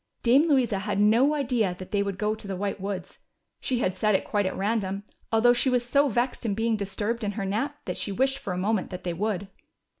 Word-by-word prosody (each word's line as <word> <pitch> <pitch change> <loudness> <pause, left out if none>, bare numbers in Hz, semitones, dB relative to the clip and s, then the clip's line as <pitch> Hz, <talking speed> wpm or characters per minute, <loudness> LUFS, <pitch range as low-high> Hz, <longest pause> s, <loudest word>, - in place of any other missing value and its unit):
Dame 265 +7 +5
Louisa 245 -8 +2
had 205 0 -2
no 235 +8 +4
idea 240 -9 0
that 185 - -9
they 205 -1 +2
would 200 -2 -2
go 210 +2 0
to 215 -2 -8
the 195 - -3
White 200 +1 -3
Woods. 195 -2 -5 0.4
She 250 -2 -1
had 185 - 0
said 215 -2 +2
it - - 0
quite 205 -2 0
at 190 - -4
random, 200 -1 -1 0.3
although 230 +2 +5
she 245 +2 +2
was 250 -1 +1
so 280 +3 +3
vexed 240 +3 -1
in 210 -4 -1
being 225 +1 +1
disturbed 210 +3 -2
in 205 -1 -1
her 200 -2 -3
nap 235 +10 -2
that - - -3
she 205 - -2
wished 265 +6 +1
for 200 - -5
a 180 - -2
moment 205 +1 0
that 180 - -7
they 175 - -2
would. 200 +1 -2
215 Hz, 240 wpm, -26 LUFS, 195-240 Hz, 0.4 s, Dame